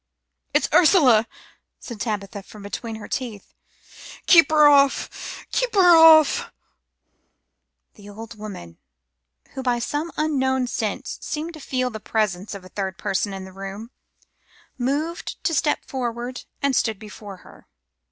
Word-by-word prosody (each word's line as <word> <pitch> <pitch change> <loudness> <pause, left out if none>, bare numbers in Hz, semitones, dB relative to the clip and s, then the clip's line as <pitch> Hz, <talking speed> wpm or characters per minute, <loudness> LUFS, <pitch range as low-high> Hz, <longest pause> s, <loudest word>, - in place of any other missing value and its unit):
"It's - - +2
Ursula," 265 - +5 0.5
said 230 -5 -9
Tabitha 205 -2 -4
from 205 +1 -14
between 225 +3 -6
her 220 - -9
teeth. 230 -6 -6 0.7
"Keep 335 -5 +7
her 305 -1 +6
off! 280 -1 +1
Keep - - -1
her 355 -3 +7
off!" 320 -2 +6 1.4
The 205 -1 -14
old 225 +2 -10
woman, 200 - -9 0.7
who 265 - -6
by 250 -2 0
some 295 +7 -3
unknown 265 -4 0
sense 225 -3 -4
seemed 315 +3 -5
to 310 - -11
feel 255 -3 -2
the 220 - -7
presence 210 -3 -2
of 190 -2 -10
a - - -12
third 190 -2 -4
person 200 0 -1
in 190 -1 -7
the 190 - -12
room, 195 +4 -8 0.8
moved 290 +7 -3
a 330 - -1
step 300 -1 0
forward 245 -1 -5 0.2
and 280 -2 +2
stood 220 -3 0
before 210 -1 -11
her. - - -17
235 Hz, 140 wpm, -23 LUFS, 205-290 Hz, 1.4 s, Keep